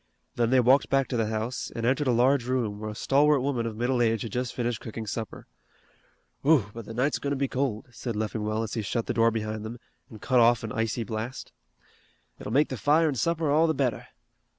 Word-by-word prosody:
Then 120 -1 +1
they 130 +1 +4
walked 130 +3 +4
back 135 -1 +2
to 130 - -2
the 115 -2 +1
house, 110 +3 -3
and 115 - -2
entered 135 +3 +1
a - - +4
large 125 +2 +3
room, 115 -5 -1
where 110 0 -5
a 105 - -7
stalwart 140 +4 +3
woman 125 -4 -1
of 110 -1 -6
middle 120 +1 +1
age 115 -2 +1
had 115 - -6
just 125 +2 -2
finished 120 -2 -2
cooking 110 0 -6
supper. 110 0 -5 1.0
"Whew, 135 -9 +3
but 115 -1 -8
the 115 - -8
night's 135 +5 +1
goin' 140 - -3
to 140 - 0
be 140 0 0
cold," 130 -5 -2
said 120 -1 -5
Leffingwell, 110 0 -2
as 110 - -5
he 115 - -1
shut 115 +3 -2
the - - -2
door 115 0 +4
behind 110 -1 -3
them, 110 +2 -6 0.3
and 110 - -11
cut 125 +4 +2
off 120 0 +4
an 110 - -4
icy 115 +1 -1
blast. 115 +3 -5 0.9
"It'll - - -6
make 145 +5 +3
the 130 - -4
fire 155 +5 +3
an' - - -1
supper 155 +4 0
all 160 +3 +4
the 160 - 0
better. 130 -4 -1
120 Hz, 230 wpm, -27 LUFS, 110-135 Hz, 1.0 s, they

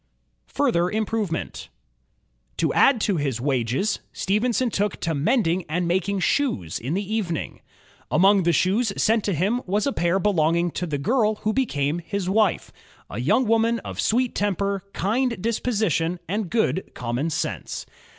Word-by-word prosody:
Further 180 -12 +1
Improvement 215 -4 -3 0.9
To - - +1
add 270 -4 +5
to 200 -5 +1
his 135 -6 -1
wages, 135 - 0
Stephenson 235 +5 0
took 205 0 -1
to 165 - -1
mending 170 - +1
and 175 +2 -1
making 190 +3 0
shoes 165 - 0
in 135 +8 -3
the 200 +2 -3
evening. 180 -8 -3 0.5
Among 195 +2 +5
the 170 -1 +2
shoes 200 +6 +2
sent 220 -1 +2
to 200 - 0
him 205 +10 0
was 205 +3 +1
a 280 - 0
pair 175 +2 +1
belonging 170 -3 +2
to 180 - -3
the 150 -3 -2
girl 215 - +1
who 215 - +2
became 160 - 0
his 180 +3 -4
wife, 210 +1 +1 0.4
a 105 - -4
young 155 - +3
woman 230 +1 +3
of - - -5
sweet 245 +2 +1
temper, 200 -1 -1
kind 235 +3 0
disposition, 210 - 0
and 205 0 -2
good 220 -3 0
common 125 +6 -2
sense. 155 - -3
195 Hz, 150 wpm, -24 LUFS, 165-220 Hz, 0.9 s, add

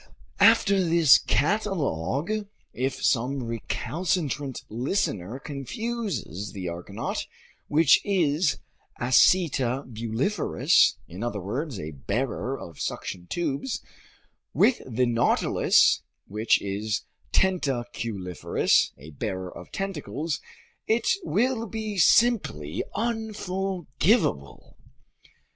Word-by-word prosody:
After 195 -1 +5
this 165 -4 +6
catalog, 155 - 0 0.4
if 130 +1 -2
some 130 +2 +1
recalcitrant 145 - -2
listener 115 - -2
confuses 140 - -4
the 95 -3 -5
argonaut, 85 +1 -4 0.4
which 155 0 +5
is 165 -5 +1 0.4
acetabuliferous 130 - +2
(in 90 +4 -9
other 120 -3 -2
words, 120 - -4
a 75 -1 -5
bearer 115 - -3
of 85 - -10
suction 90 -1 -4
tubes), 175 - -2 0.8
with 255 - +4
the 125 +1 +1
nautilus, 120 -1 +3 0.2
which 110 +3 +2
is 105 +3 -2 0.3
tentaculiferous 120 - 0
(a 75 +4 -12
bearer 95 +5 -5
of - - -11
tentacles), 165 -5 -3 0.5
it 225 +1 +1 0.2
will 240 -4 0
be 215 -2 -4
simply 180 - +3
unforgivable. 195 - -1
135 Hz, 85 wpm, -26 LUFS, -, 0.8 s, this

